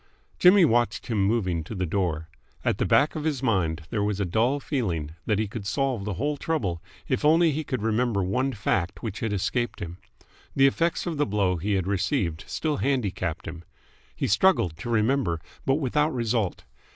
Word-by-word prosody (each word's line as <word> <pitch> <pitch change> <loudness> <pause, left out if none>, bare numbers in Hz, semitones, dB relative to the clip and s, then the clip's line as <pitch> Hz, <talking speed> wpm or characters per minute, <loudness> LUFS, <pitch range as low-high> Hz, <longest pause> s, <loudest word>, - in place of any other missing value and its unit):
Jimmy 180 0 +7
watched 120 -6 +1
him 110 -4 0
moving 95 -6 0
to 90 - -7
the 95 -1 -1
door. 80 -3 -1 0.4
At - - +1
the - - +1
back 145 +2 +3
of 155 - -3
his 145 -4 -1
mind 85 -8 +1
there 105 - 0
was 105 -1 -1
a 100 - +1
dull 115 +10 +1
feeling 90 - -2 0.2
that 105 - +2
he 110 0 0
could 100 -1 -6
solve 130 -3 -1
the 105 -3 -3
whole 145 +6 -1
trouble 105 - -2 0.3
if 130 - -1
only 160 +2 +5
he 155 +2 -2
could 130 -6 -3
remember 110 -2 +1
one 125 +9 0
fact 95 -3 -1
which 110 -2 -4
had 110 - -2
escaped 115 +5 -1
him. 85 +1 -7 0.6
The 135 - +5
effects 165 +5 +1
of 170 -4 -3
the 145 - +1
blow 100 -3 +1
he 100 +5 -1
had 95 -3 +1
received 95 - -1
still 155 -2 -1
handicapped 100 - -1
him. 80 +1 -7 0.5
He - - -2
struggled 105 - +3
to 100 - -6
remember, 110 -6 +1 0.3
but 135 - +4
without 150 +2 +1
result. 115 -5 -1
110 Hz, 190 wpm, -26 LUFS, 95-135 Hz, 0.6 s, Jimmy